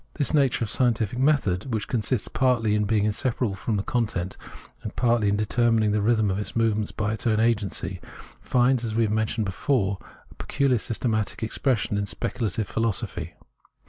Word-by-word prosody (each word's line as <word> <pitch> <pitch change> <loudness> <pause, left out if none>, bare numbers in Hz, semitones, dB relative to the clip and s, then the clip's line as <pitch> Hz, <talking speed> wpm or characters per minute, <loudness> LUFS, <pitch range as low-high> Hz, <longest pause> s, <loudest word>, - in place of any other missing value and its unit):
This 145 - 0
nature 135 -5 +2
of 110 - -3
scientific 120 -2 +1
method, 130 -7 +1
which 110 -2 -2
consists 115 -1 0
partly 120 -5 +1
in 105 0 +1
being 105 -1 +1
inseparable 110 +1 -1
from 105 +2 -2
the 100 - -1
content, 100 -7 -2 0.5
and 110 - -7
partly 115 -4 +2
in 100 - +2
determining 110 0 +2
the 105 0 +1
rhythm 110 -2 +2
of 95 - -2
its 105 - -5
movement 110 -2 0
by 105 0 0
its 110 +2 -3
own 110 -1 +2
agency, 110 -4 0 0.4
finds, 125 0 +2
as 110 -2 -2
we 115 0 +3
mentioned 110 +1 0
before, 100 0 0 0.3
its - - -18
peculiar 135 -4 +1
systematic 110 -1 -2
expression 110 -3 0
in 100 - -2
speculative 105 +1 -2
philo 115 +1 0
sophy. 100 - -4
110 Hz, 175 wpm, -25 LUFS, 105-120 Hz, 0.5 s, we